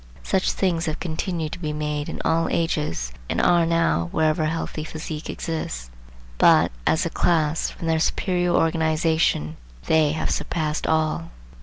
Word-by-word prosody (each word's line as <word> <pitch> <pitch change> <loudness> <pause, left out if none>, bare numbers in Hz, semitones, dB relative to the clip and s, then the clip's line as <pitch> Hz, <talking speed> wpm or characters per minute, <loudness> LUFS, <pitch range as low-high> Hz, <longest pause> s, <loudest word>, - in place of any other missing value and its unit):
Such 190 -1 +1
things 175 -3 0
have 155 +1 -2
continued 165 -1 -3
to - - -6
be 155 -3 -3
made 150 -1 -3
in - - -5
all 165 0 +2
ages, 150 - -1 0.2
and - - 0
are 170 -1 +4
now, 165 - +1
wherever 155 0 +2
a 155 - +2
healthy 160 -1 -3
physique 155 0 -6
exists; 60 - -4 0.5
but, - - +6 0.2
as 165 +4 +2
a - - 0
class, 160 -2 +1
from - - -8
their 160 -1 +2
superior 180 +1 +1
organization, 160 - +1 0.3
they 155 -2 +3
have 160 - -2
surpassed 155 -2 -2
all. 160 +1 0
160 Hz, 155 wpm, -23 LUFS, 155-165 Hz, 0.5 s, but